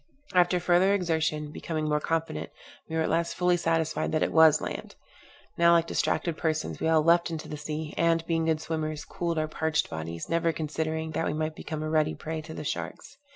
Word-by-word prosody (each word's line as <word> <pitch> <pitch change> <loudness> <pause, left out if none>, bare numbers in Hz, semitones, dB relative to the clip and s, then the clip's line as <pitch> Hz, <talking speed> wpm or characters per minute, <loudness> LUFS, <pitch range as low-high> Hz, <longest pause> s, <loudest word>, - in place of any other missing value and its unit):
After 180 0 +4
further 180 +3 +4
exertion, 160 -4 -1
becoming 155 -1 -3
more 150 0 +2
confident, 160 - -2 0.4
we 160 - -3
were 160 - +2
at - - -1
last 165 +1 0
fully 180 0 +3
satisfied 165 -2 0
that 155 - +2
it - - 0
was 160 -1 +7
land. - - -6 0.6
Now, 170 0 +6
like 165 -1 +4
distracted 165 -1 0
persons, 155 -1 -1
we - - 0
all 160 -1 +4
leapt 170 +2 +4
into 160 -2 -5
the - - -5
sea, 150 +1 -5
and, 165 -1 +2
being 165 -1 0
good 160 -1 +1
swimmers, 155 -2 -3
cooled 170 -1 -3
our 155 0 +1
parched 160 0 -1
bodies, 80 +1 -5
never 165 0 +1
considering 160 +1 -3
that 160 - -1
we - - -1
might 155 0 -2
become 155 -1 -5
a - - -2
ready 155 -1 +2
prey 160 0 -5
to 160 +1 -9
the - - -5
sharks. 155 - -5
160 Hz, 205 wpm, -28 LUFS, 155-165 Hz, 0.6 s, was